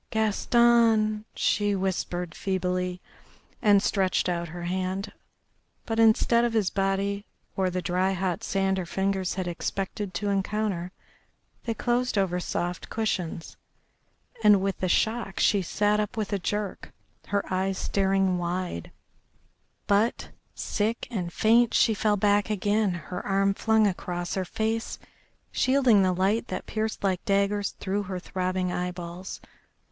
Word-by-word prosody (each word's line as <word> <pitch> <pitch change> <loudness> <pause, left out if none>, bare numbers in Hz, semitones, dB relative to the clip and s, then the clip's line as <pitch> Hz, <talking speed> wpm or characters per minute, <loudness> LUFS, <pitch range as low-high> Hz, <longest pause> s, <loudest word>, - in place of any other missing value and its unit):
"Gaston," 220 0 +3
she 205 -1 +1
whispered 180 -2 -2
feebly, 180 -1 -2 0.6
and 205 -3 +5
stretched 190 -3 +1
out 170 -1 -1
her 175 +2 -7
hand. 185 +2 -2 0.7
But 225 0 -2
instead 225 +1 +4
of 240 -1 0
his 215 -4 +1
body 195 +1 -1 0.3
or 190 -1 +1
the 180 0 -3
dry 185 +2 +1
hot 185 -2 -2
sand 195 -1 0
her 180 - -4
fingers 190 0 -1
had 185 -2 -3
expected 190 +2 -4
to 205 +3 -1
encounter 195 -2 -1 0.7
they 230 -2 -1
closed 245 0 0
over 185 -2 +1
soft 175 0 -3
cushions, 180 -7 -3 0.9
and 210 -2 +7
with 195 0 -2
the 185 - -1
shock 220 0 0
she 200 - +3
sat 210 +4 +1
up 210 +1 -2
with 210 -1 -2
a 200 - 0
jerk, 205 +2 -3 0.4
her 200 0 0
eyes 190 +1 0
staring 195 -2 +1
wide, 175 - -3 1.0
but, 205 +3 +1 0.3
sick 220 +2 -1
and 180 -6 -3
faint, 230 +4 +3
she 225 - +4
fell 210 0 +1
back 205 +1 +2
again, 210 0 +1
her 175 +2 -6
arm 195 0 +2
flung 220 +1 +3
across 175 -2 -2
her 190 -1 -1
face, 225 +3 -2 0.5
shielding 255 -5 +4
the 185 -1 +3
light 195 +6 +1
that - - -5
pierced 220 -1 -3
like 185 -2 0
daggers 200 0 +1
through 200 +2 -1
her 190 -2 -5
throbbing 185 0 -2
eye 180 0 -2
balls. 175 +1 -7
195 Hz, 140 wpm, -27 LUFS, 185-215 Hz, 1.0 s, and